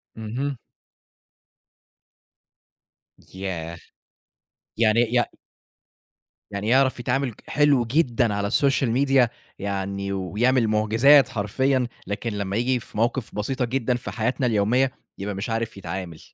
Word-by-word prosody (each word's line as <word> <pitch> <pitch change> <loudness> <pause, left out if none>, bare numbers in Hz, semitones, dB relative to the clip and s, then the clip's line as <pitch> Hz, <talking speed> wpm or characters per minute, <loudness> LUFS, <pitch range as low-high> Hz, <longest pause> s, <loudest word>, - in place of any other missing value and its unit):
اهم. 125 +6 -3 2.8
ياه! 85 -3 -5 1.0
يعني 110 0 +3
يع 120 - +4 1.3
يعني 100 +1 -4
يعرف 130 +1 +3
يتعامل 125 +1 -1
ك - - -21
حلو 145 -5 +3
جدًا 120 -4 +1
على 100 0 -1
السوشال 135 +1 +2
ميديا 135 -1 +3 0.3
يعني 100 0 -3
ويعمل 115 +6 +1
معجزات 110 +6 +5
حرفيًا، 125 +5 0 0.2
لكن 105 +4 -3
لما 100 -1 -3
ييجي 125 +2 +1
في 110 - -10
مواقف 120 +2 -1
بسيطة 125 +5 -1
جدًا 125 0 0
في 120 -5 -5
حياتنا 120 +5 -1
اليومية، 120 +4 +2 0.3
يبقى 100 +1 -4
مش 100 +5 -4
عارف 115 -1 -2
يتعامل، 90 -3 -6
115 Hz, 115 wpm, -24 LUFS, 100-130 Hz, 2.8 s, معجزات